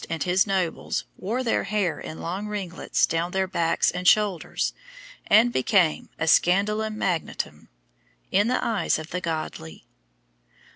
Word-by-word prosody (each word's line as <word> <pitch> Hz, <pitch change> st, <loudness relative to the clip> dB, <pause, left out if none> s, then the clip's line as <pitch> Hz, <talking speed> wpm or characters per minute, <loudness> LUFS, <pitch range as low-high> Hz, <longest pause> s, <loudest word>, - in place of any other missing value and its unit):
and 165 Hz, -1 st, -2 dB
his 185 Hz, +2 st, +2 dB
nobles 190 Hz, -4 st, -1 dB
wore 235 Hz, +7 st, -3 dB
their 230 Hz, -, 0 dB
hair 200 Hz, -4 st, -1 dB
in 160 Hz, -, -7 dB
long 190 Hz, +5 st, -4 dB
ringlets 195 Hz, -4 st, -1 dB
down 165 Hz, +1 st, -1 dB
their 190 Hz, +1 st, 0 dB
backs 165 Hz, -2 st, +1 dB
and 180 Hz, 0 st, -3 dB
shoulders, 205 Hz, -5 st, +2 dB, 0.5 s
and 230 Hz, +3 st, +5 dB
became 175 Hz, -, +2 dB
a 165 Hz, -, -1 dB
scandalum 210 Hz, +6 st, +2 dB
magnatum 155 Hz, -, -3 dB, 0.6 s
in 205 Hz, +3 st, +3 dB
the 250 Hz, -, 0 dB
eyes 225 Hz, -3 st, +1 dB
of 160 Hz, +1 st, -8 dB
the 180 Hz, -, -3 dB
godly. 155 Hz, -, -5 dB
185 Hz, 140 wpm, -25 LUFS, 165-210 Hz, 0.6 s, and